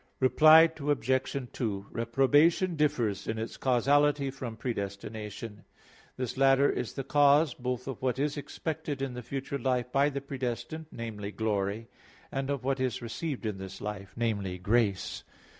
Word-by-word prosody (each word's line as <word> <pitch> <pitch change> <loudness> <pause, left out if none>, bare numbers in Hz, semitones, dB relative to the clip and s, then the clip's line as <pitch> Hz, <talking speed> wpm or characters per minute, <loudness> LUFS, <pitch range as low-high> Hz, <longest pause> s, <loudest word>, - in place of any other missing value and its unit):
Reply 155 +5 +7
Obj. 130 -2 0
2: 100 -5 -3
Reprobation 145 +10 +3
differs 120 -10 0
in 110 - -2
its 110 +1 -4
causality 140 +2 +2
from 125 -4 -7
predestination. 105 -1 -5 0.5
This 125 -1 -3
latter 135 +1 +5
is - - -3
the 135 - -4
cause 145 +1 +4
both 125 0 -4
of 135 -4 -5
what 130 -1 0
is 145 +1 0
expected 150 0 -4
in 135 -2 -3
the 125 - -6
future 135 +3 -4
life 125 -1 0
by 140 +2 +3
the 140 -1 -3
predestined 135 +3 -4
namely, 110 -3 -5
glory 105 0 -1 0.4
and 135 0 -2
of 140 -3 -2
what 135 0 0
is 130 -2 -1
received 125 +3 -4
in 105 -3 -3
this 95 0 -8
life 100 -3 -6
namely, 100 -6 -1
grace. 100 0 0
125 Hz, 150 wpm, -29 LUFS, 110-140 Hz, 0.5 s, Reply